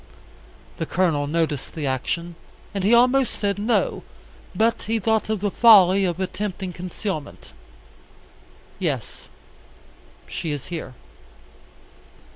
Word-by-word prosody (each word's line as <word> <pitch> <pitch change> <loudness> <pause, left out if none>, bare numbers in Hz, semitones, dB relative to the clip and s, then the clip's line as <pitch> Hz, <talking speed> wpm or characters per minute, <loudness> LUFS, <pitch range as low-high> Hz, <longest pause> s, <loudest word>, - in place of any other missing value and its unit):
The 165 - -3
Colonel 165 -6 +1
noticed 155 -2 -2
the 155 -3 -3
action, 170 +6 -2 0.4
and 200 -2 -2
he 205 - +3
almost 250 +2 +4
said 200 -1 -1
"no," 240 - 0 0.5
but 225 +1 +2
he 225 - +2
thought 220 +1 0
of 215 -3 -1
the 205 -1 0
folly 195 -4 +6
of 175 -1 -2
attempting 190 -1 -4
concealment. 180 -3 -6 1.3
"Yes. - - -4 1.0
She 165 - -5
is 145 -3 -4
here." 155 -6 -6
185 Hz, 110 wpm, -23 LUFS, 165-215 Hz, 1.3 s, folly